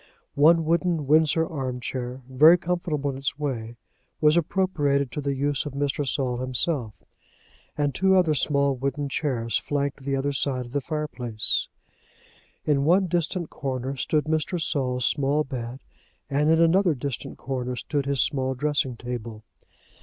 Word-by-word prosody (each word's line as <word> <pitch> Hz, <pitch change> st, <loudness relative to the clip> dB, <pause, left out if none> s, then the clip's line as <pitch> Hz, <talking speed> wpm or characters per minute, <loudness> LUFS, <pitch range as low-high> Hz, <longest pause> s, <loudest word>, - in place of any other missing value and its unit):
One 160 Hz, +3 st, +5 dB
wooden 170 Hz, -1 st, +1 dB
Windsor 160 Hz, +2 st, +4 dB
arm 130 Hz, -5 st, -4 dB
chair 125 Hz, +1 st, -5 dB
very 155 Hz, +7 st, +7 dB
comfortable 170 Hz, -5 st, -2 dB
in 135 Hz, -, -7 dB
its 135 Hz, 0 st, -2 dB
way 120 Hz, -6 st, -4 dB, 0.4 s
was 150 Hz, 0 st, +4 dB
appropriated 150 Hz, -6 st, +1 dB
to 150 Hz, -, -4 dB
the 140 Hz, -1 st, -1 dB
use 145 Hz, +1 st, -1 dB
of 145 Hz, -, -6 dB
Mr. 140 Hz, 0 st, -1 dB
Saul 125 Hz, -2 st, 0 dB
himself, 130 Hz, -, -2 dB, 0.8 s
and 145 Hz, -2 st, 0 dB
two 190 Hz, +6 st, +3 dB
other 170 Hz, -4 st, +3 dB
small 140 Hz, -1 st, +2 dB
wooden 140 Hz, +2 st, -2 dB
chairs 125 Hz, -6 st, -1 dB
flanked 140 Hz, -1 st, -2 dB
the 135 Hz, 0 st, -1 dB
other 140 Hz, +1 st, -1 dB
side 130 Hz, -2 st, 0 dB
of 120 Hz, -, -12 dB
the 145 Hz, +1 st, -1 dB
fireplace. 130 Hz, -7 st, -2 dB, 1.0 s
In 140 Hz, -2 st, +2 dB
one 180 Hz, +6 st, +4 dB
distant 175 Hz, 0 st, -1 dB
corner 135 Hz, -1 st, -3 dB
stood 150 Hz, +3 st, 0 dB
Mr. 160 Hz, +3 st, -1 dB
Saul's 130 Hz, -5 st, -1 dB
small 145 Hz, +1 st, +2 dB
bed, 125 Hz, -1 st, -6 dB, 0.5 s
and 145 Hz, +2 st, +2 dB
in 160 Hz, 0 st, +4 dB
another 170 Hz, 0 st, +4 dB
distant 135 Hz, 0 st, -5 dB
corner 125 Hz, -2 st, -3 dB
stood 140 Hz, +2 st, -2 dB
his 140 Hz, -1 st, +1 dB
small 130 Hz, -1 st, -1 dB
dressing 135 Hz, -3 st, 0 dB
table. 115 Hz, -3 st, -6 dB
140 Hz, 155 wpm, -25 LUFS, 130-155 Hz, 1.0 s, very